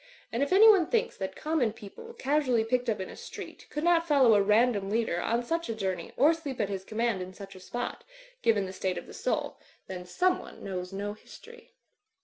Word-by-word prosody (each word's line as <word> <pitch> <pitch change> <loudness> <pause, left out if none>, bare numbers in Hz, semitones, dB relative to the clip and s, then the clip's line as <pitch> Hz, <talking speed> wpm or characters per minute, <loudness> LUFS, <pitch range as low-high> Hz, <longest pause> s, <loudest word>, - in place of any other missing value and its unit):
And 235 - -1
if 280 - 0
anyone 395 -3 +7
thinks 470 0 0
that 190 -1 -4
common 300 -8 0
people, 350 - -11
casually 270 - +1
picked 250 +2 0
up 215 - 0
in 190 - -4
a - - -10
street, - - -9
could 300 - -4
not 340 -1 +3
follow 270 -7 +5
a 205 - +5
random 210 -1 +3
leader 215 -5 0
on 235 +5 0
such 330 +4 -2
a 225 - -2
journey 190 -4 -3
or 295 +6 +6
sleep 295 -6 -6
at 200 - 0
his 195 -2 -4
command 220 -1 -1
in 185 +1 -7
such 195 0 -10
a 185 - -12
spot, 240 +6 -5 0.4
given 210 -4 +2
the 185 - -7
state 185 -1 -2
of - - -6
the - - -12
soul, - - -2 0.3
then 180 -1 -6
someone 360 - -1
knows 180 -1 -4
no 200 +1 -4
history. 470 - -15
230 Hz, 210 wpm, -29 LUFS, 195-305 Hz, 0.4 s, anyone